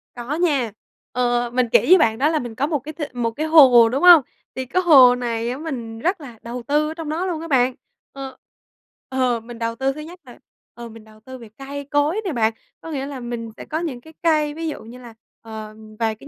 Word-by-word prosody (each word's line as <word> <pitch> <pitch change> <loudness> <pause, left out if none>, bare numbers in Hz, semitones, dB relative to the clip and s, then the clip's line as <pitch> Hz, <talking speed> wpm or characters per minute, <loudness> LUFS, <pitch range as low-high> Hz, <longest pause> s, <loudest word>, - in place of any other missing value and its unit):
Có 245 +4 -4
nha. 290 -9 0 0.4
Ờ, 245 -1 0
mình 250 -1 +1
kể - - +6
với 370 - +7
bạn 225 -8 +2
đó 290 +4 +2
là 315 -2 0
mình 240 -2 -7
có 280 +5 -1
một 300 -3 -1
cái 305 +4 -9
th 310 - -11
một 235 -2 -1
cái 305 +7 -4
hồ, 260 -8 +7
đúng 270 +7 -2
hông? 350 -3 +9 0.3
Thì 260 0 -4
cái 365 +9 0
hồ 265 -7 +7
này 235 -1 -3
á, 250 - -4
mình 245 -8 -6
rất 355 - -1
là 240 -6 -11
đầu 240 +1 -7
tư 300 +1 +1
ở 315 - -5
trong 325 -2 -7
đó 335 +4 -2
luôn 340 -4 -3
á, 330 - -7
bạn, 255 -4 +2 0.4
ờ. 270 -1 -8 0.7
Ờ, 255 -2 0
mình 230 +1 -11
đầu 230 0 -2
tư 270 +2 -1
thứ 305 - -8
nhất 340 +3 -11
là, 245 -2 -15 0.3
ờ, 235 0 -9
mình 225 -1 -13
đầu 215 0 -19
tư 260 +4 -11
về 230 -3 -13
cây 280 +1 -7
cối 290 +8 0
nè, 370 - -1
bạn, 225 -2 +1 0.3
có 325 - -8
nghĩa 275 -3 -3
là 280 -2 -7
mình 240 -2 -6
sẽ - - -9
có 315 +1 -3
những 275 -8 -5
cái 320 - -16
cây, 305 -3 +2
ví 325 +1 -5
dụ 305 - -6
như 230 +3 -12
là, 240 -2 -12 0.3
ờ, 220 -1 -9 0.2
vài 220 -1 0
cái 275 - -15
260 Hz, 250 wpm, -21 LUFS, 235-305 Hz, 0.7 s, hông